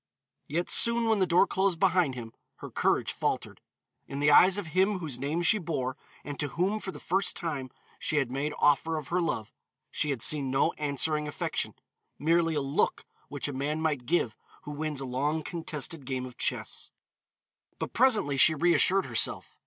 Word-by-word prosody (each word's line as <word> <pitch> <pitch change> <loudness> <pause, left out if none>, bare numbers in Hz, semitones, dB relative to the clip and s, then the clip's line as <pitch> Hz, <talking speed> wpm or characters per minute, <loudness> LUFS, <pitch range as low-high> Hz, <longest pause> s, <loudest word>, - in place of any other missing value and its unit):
Yet 170 +4 -1
soon, 235 0 +3
when 220 -2 +2
the 185 - +2
door 175 +3 +5
closed 190 -4 0
behind 180 -7 +2
him, 115 -2 -8 0.2
her - - -10
courage - - +1
faltered. - - -3 0.5
In 140 - -5
the 145 +1 +4
eyes 185 +6 +7
of 205 - -3
him 190 +2 +3
whose 150 -8 -5
name 150 +6 -1
she 215 +5 +4
bore 135 -7 -3 0.3
and 145 -1 -7
to 150 - 0
whom 190 +8 -1
for 190 - -5
the - - -10
first 190 +3 0
time 145 -7 -3 0.3
she 155 - -1
had 135 -4 0
made 145 +3 -2
offer 155 +2 +2
of 150 -2 -7
her 180 +1 +1
love, 110 -10 -3 0.4
she 150 - -1
had 135 -5 -1
seen 145 -3 +2
no 135 +1 +2
answering 150 +1 0
affection 145 - -3 0.4
merely 165 +1 +2
a 145 - 0
look 135 +1 0 0.2
which - - -4
a 145 - -4
man 145 +4 -2
might 150 -6 -1
give 160 -9 +1 0.3
who 150 - -7
wins 150 -1 -3
a - - -4
long 145 +5 -1
contested 160 -2 -5
game 130 -1 -3
of 125 -1 -10
chess. - - -3 0.9
But - - -5
presently 220 - +3
she 155 +4 +6
reassured 175 +4 +3
herself. 115 -4 0
155 Hz, 185 wpm, -28 LUFS, 140-175 Hz, 0.9 s, eyes